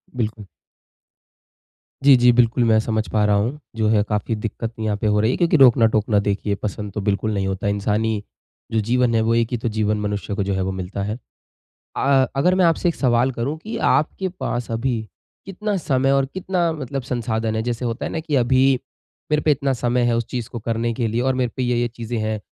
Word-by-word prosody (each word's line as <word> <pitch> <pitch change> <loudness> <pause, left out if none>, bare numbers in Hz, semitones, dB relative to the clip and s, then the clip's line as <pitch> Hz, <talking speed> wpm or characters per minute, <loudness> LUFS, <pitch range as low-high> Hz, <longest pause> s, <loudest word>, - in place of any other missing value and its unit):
बिल्कुल। 110 -3 -3 1.6
जी, 140 -1 +8
जी। 125 0 +5
बिल्कुल 120 0 +3
मैं 110 -1 +4
समझ 110 0 -1
पा 105 -1 +2
रहा 105 0 +3
हूँ। 115 +9 -1 0.2
जो 110 -1 +1
है 110 -1 +3
काफ़ी 105 +2 -1
दिक्कत 115 +1 -5
यहाँ 110 -2 -1
पे 110 - -1
हो 105 0 +2
रही 110 +3 +2
है - - -2
क्योंकि 170 -2 +3
रोकना-टोकना 115 -5 +4
देखिए 100 0 0
पसंद 105 0 -4
तो 105 - -3
बिल्कुल 105 +2 0
नहीं 100 -1 -1
होता 95 +2 -3
है। - - +2
इंसानी 105 +1 0 0.5
जो 110 - +1
जीवन 125 -1 +2
है 110 - +3
वो 115 +1 +2
एक 115 -1 +2
ही 120 - 0
तो 120 +1 -3
जीवन 105 0 +1
मनुष्य 105 0 -3
को 100 - -1
जो 100 - -1
है 95 - -1
वो 95 - -1
मिलता 95 +1 -4
है। 105 +3 -3 0.8
अ 135 -1 +3
अगर 180 +7 +3
मैं 185 - +4
आपसे 170 +1 +2
एक 170 - -3
सवाल 125 0 +2
करूँ 130 +6 -3
कि 220 +8 -6
आपके 185 +5 +1
पास 120 -1 -3
अभी 115 0 -1 0.4
कितना 205 +2 -3
समय 135 -5 +1
और 135 -1 +3
कितना 180 -2 0
मतलब 140 -2 -4
संसाधन 115 -3 -2
है, 110 - 0
जैसे 120 +1 -3
होता 115 -1 -3
है - - -4
ना 160 - -2
कि 155 -2 -2
अभी 130 +2 +4 0.6
मेरे 150 - +3
पे 155 - +3
इतना 140 -1 0
समय 120 0 0
है 120 - +2
उस 115 - -1
चीज़ 120 -3 -4
को 120 - -6
करने 115 +1 -1
के 115 -1 -1
लिए 115 +2 -1
और 130 +1 +1
मेरे 125 -2 0
पे 130 - 0
ये-ये 120 -1 +1
चीज़ें 115 0 -5
हैं। 110 0 -2
115 Hz, 225 wpm, -21 LUFS, 110-130 Hz, 1.6 s, जी